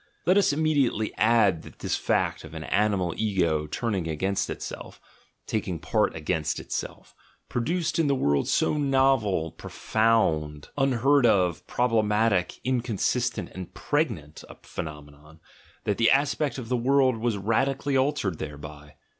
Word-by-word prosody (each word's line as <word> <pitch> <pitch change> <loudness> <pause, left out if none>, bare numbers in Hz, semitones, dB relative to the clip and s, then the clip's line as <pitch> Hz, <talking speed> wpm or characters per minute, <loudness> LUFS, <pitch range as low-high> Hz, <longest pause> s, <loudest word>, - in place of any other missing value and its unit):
Let 185 - +4
us 200 -5 +4
immediately 145 -8 +1
add 105 -6 +3
that - - -14
this - - -2
fact - - 0
of 80 0 -11
an 80 - -5
animal 100 -3 +1
ego 85 -8 0
turning 95 0 -2
against 95 +5 -1
itself, - - -7 0.5
taking 105 -5 -2
part - - 0
against 80 -1 -2
itself, - - -6 0.4
pro 120 - -1
duced 170 +6 -1
in 160 - +3
the 140 - +2
world 70 - +1
so 155 - +1
novel, 130 - +2
profound, 80 -10 0
unheard 135 0 +3
of, 90 -6 +1
prob 125 0 0
lematic, 105 -4 +1
inconsistent, 120 -1 -1
and 95 -2 -9
pregnant 95 - -2
a - - -11
phenomenon, 75 0 -9 0.4
that 105 - -1
the 115 - +5
aspect 140 +1 +1
of 125 -3 -6
the 125 - 0
world 130 0 +3
was 115 -2 -1
radically 135 +7 0
altered 130 - 0
thereby. 75 0 -8
110 Hz, 140 wpm, -26 LUFS, 80-130 Hz, 0.5 s, the